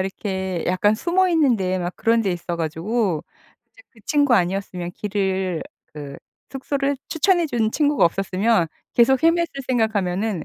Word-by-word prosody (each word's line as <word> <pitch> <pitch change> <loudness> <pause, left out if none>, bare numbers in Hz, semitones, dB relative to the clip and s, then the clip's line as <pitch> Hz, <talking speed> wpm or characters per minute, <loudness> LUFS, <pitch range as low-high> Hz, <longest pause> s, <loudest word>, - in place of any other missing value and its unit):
이렇게 190 -2 -3
약간 195 +4 +2
숨어 360 +9 +1
있는 300 -8 +3
데 185 -1 -1
막 175 0 -4
그런 230 0 +2
데 200 - 0
있어 175 0 -4
가지고 170 +3 -1 0.5
이제 - - -19
그 225 - -21
친구 285 -4 +3
아니었으면 180 -2 -1
길을 190 -4 -2 0.3
그 145 -2 -8 0.3
숙소를 275 +1 -2
추천해 345 +1 +2
준 230 -6 0
친구가 295 -1 +2
없었으면 195 +2 +1 0.3
계속 250 +2 +4
헤맸을 330 -3 +1
생각하면은 210 -5 0
210 Hz, 320 characters per minute, -22 LUFS, 185-270 Hz, 0.5 s, 계속